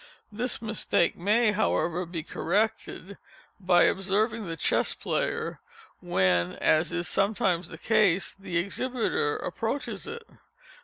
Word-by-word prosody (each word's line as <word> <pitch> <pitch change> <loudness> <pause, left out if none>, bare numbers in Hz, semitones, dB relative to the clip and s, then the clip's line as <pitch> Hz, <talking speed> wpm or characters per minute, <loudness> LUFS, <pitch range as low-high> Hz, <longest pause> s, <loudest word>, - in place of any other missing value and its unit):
This 235 +2 -2
mistake 215 -5 +1
may, 215 +5 +2
however, 180 -4 0
be 165 -2 -5
corrected 200 0 -2 0.4
by 180 -2 +4
observing 210 +3 +1
the 165 -1 -5
Chess - - +1
Player - - -2 0.4
when, 90 -1 +1
as 155 +2 +2
is 175 0 -2
sometimes 195 -4 +1
the 160 - -10
case, 200 -3 +2
the 195 -3 -4
exhibiter 200 - -1
approaches 230 +5 -4
it. 470 0 -7
195 Hz, 115 wpm, -27 LUFS, 170-220 Hz, 0.4 s, by